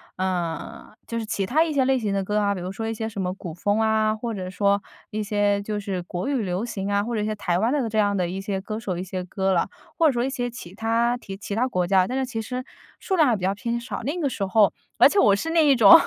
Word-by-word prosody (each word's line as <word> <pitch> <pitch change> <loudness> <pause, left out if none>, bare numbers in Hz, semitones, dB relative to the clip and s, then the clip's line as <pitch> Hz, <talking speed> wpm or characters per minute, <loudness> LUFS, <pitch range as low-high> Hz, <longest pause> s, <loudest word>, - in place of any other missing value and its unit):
呃， 180 -3 -3
就 230 - -3
是 225 - -4
其 200 -2 -1
它 305 +11 +3
一 330 - -2
些 275 -3 +2
类 265 0 +3
型 210 -4 -1
的 195 0 0
歌 210 +2 0
啊， 200 -1 +1
比 - - -5
如 180 +1 -4
说 225 +3 -4
一 - - -1
些 220 0 -3
什 205 -3 -4
么 180 -1 -1
古 175 -5 -7
风 205 +5 0
啊， 220 -1 +2
或 230 +1 -4
者 185 -3 -4
说 200 +1 +2 0.3
一 215 - -2
些 205 -1 +1
就 210 +1 -3
是 195 -3 -3
国 175 +1 -4
语 275 -4 +1
流 190 +2 -2
行 200 -4 -3
啊， 200 0 +2
或 235 +3 -3
者 215 - 0
一 - - -1
些 215 - -1
台 180 -4 0
湾 225 +5 +2
的 275 -4 +1
这 220 0 0
样 205 -1 +2
的 180 -2 +1
一 190 +2 -4
些 195 -1 -2
歌 215 +3 -5
手， 190 -6 -3
一 180 - -3
些 185 0 -4
歌 190 +1 0
了， 175 - +1 0.3
或 325 - +6
者 - - +4
说 240 0 0
一 - - -1
些 245 -3 -2
其 210 -7 -10
他 230 +3 +1
提 195 -5 -8
其 200 0 -6
他 240 +5 +1
国 180 -8 0
家。 185 0 +3
但 255 - -2
是 265 - 0
其 235 -3 -4
实 250 +3 -5 0.3
数 385 - -1
量 315 -5 +5
还 240 - +3
比 195 - -6
较 190 +1 +2
偏 235 +3 -2
少， 235 -2 -5
那 290 +9 -2
个 300 - +1
时 200 - -3
候 200 +1 +4 0.2
而 - - +8
且 405 - +2
我 200 - +6
是 320 +11 -3
那 330 -1 +4
一 285 -2 +5
种， 215 -5 +9
210 Hz, 320 characters per minute, -24 LUFS, 195-235 Hz, 0.3 s, 种